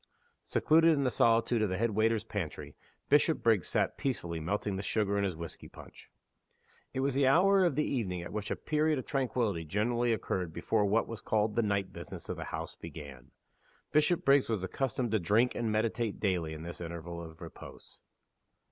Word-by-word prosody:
Secluded 165 Hz, +1 st, +4 dB
in 140 Hz, -, 0 dB
the 130 Hz, -, +1 dB
solitude 115 Hz, 0 st, +3 dB
of 105 Hz, -, +1 dB
the 95 Hz, -, -1 dB
head 115 Hz, +2 st, +1 dB
waiter's 110 Hz, +1 st, +2 dB
pantry, -, -, -5 dB, 0.3 s
Bishopriggs 115 Hz, -, +3 dB
sat -, -, 0 dB
peacefully 85 Hz, -11 st, -2 dB
melting 100 Hz, +4 st, -2 dB
the 95 Hz, -, -3 dB
sugar 100 Hz, 0 st, 0 dB
in 100 Hz, -, +1 dB
his 95 Hz, -4 st, -1 dB
whisky 85 Hz, 0 st, -8 dB
punch. -, -, -14 dB, 0.8 s
It 130 Hz, -, -2 dB
was 135 Hz, 0 st, +1 dB
the 135 Hz, 0 st, +3 dB
hour 190 Hz, +7 st, +5 dB
of 170 Hz, -6 st, +2 dB
the 150 Hz, -, +2 dB
evening 95 Hz, -9 st, -2 dB
at -, -, -8 dB
which 105 Hz, -1 st, -3 dB
a -, -, 0 dB
period 155 Hz, 0 st, +1 dB
of 130 Hz, -, -4 dB
tranquillity 120 Hz, -, -1 dB
generally 115 Hz, +8 st, 0 dB
occurred 90 Hz, -6 st, -2 dB
before 105 Hz, +5 st, +1 dB
what 105 Hz, +3 st, +2 dB
was 115 Hz, -2 st, -7 dB
called 105 Hz, 0 st, 0 dB
"the 115 Hz, -, +3 dB
night 100 Hz, -3 st, -1 dB
business" -, -, -8 dB
of -, -, -2 dB
the -, -, -5 dB
house -, -, -5 dB
began. 70 Hz, -5 st, -10 dB, 0.6 s
Bishopriggs 150 Hz, -4 st, +3 dB
was 110 Hz, -5 st, -1 dB
accustomed 120 Hz, +3 st, -2 dB
to 110 Hz, -, +2 dB
drink 105 Hz, +8 st, +2 dB
and 115 Hz, -2 st, -1 dB
meditate 110 Hz, 0 st, -1 dB
daily 90 Hz, -6 st, 0 dB
in 80 Hz, -, -8 dB
this 85 Hz, +1 st, -7 dB
interval 85 Hz, 0 st, -6 dB
of 80 Hz, -1 st, -10 dB
repose. -, -, -11 dB
110 Hz, 185 wpm, -31 LUFS, 90-130 Hz, 0.8 s, hour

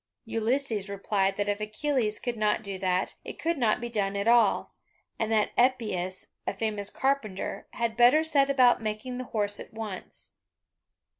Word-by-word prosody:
Ulysses 225 Hz, -2 st, 0 dB
replied 195 Hz, -1 st, 0 dB
that 205 Hz, 0 st, -1 dB
if 205 Hz, 0 st, 0 dB
Achilles 215 Hz, 0 st, -1 dB
could 245 Hz, -2 st, -3 dB
not 215 Hz, 0 st, +1 dB
do 195 Hz, -2 st, -5 dB
that, 185 Hz, 0 st, 0 dB
it -, -, -8 dB
could 330 Hz, -2 st, -1 dB
not 225 Hz, -2 st, +2 dB
be 240 Hz, -, -4 dB
done 200 Hz, -4 st, -1 dB
at 200 Hz, +2 st, -1 dB
all, 235 Hz, 0 st, +4 dB, 0.5 s
and 225 Hz, 0 st, -1 dB
that 215 Hz, -1 st, +2 dB
Epeius, 215 Hz, -8 st, +1 dB, 0.2 s
a -, -, -1 dB
famous 210 Hz, -1 st, -2 dB
carpenter, 265 Hz, -9 st, -2 dB
had 235 Hz, -2 st, -1 dB
better 245 Hz, +6 st, +6 dB
set 280 Hz, -3 st, +3 dB
about 250 Hz, -3 st, +5 dB
making 220 Hz, +4 st, -4 dB
the 255 Hz, -, -4 dB
horse 205 Hz, -3 st, -1 dB
at -, -, -10 dB
once. 215 Hz, -4 st, -6 dB
220 Hz, 165 wpm, -28 LUFS, 205-245 Hz, 0.5 s, better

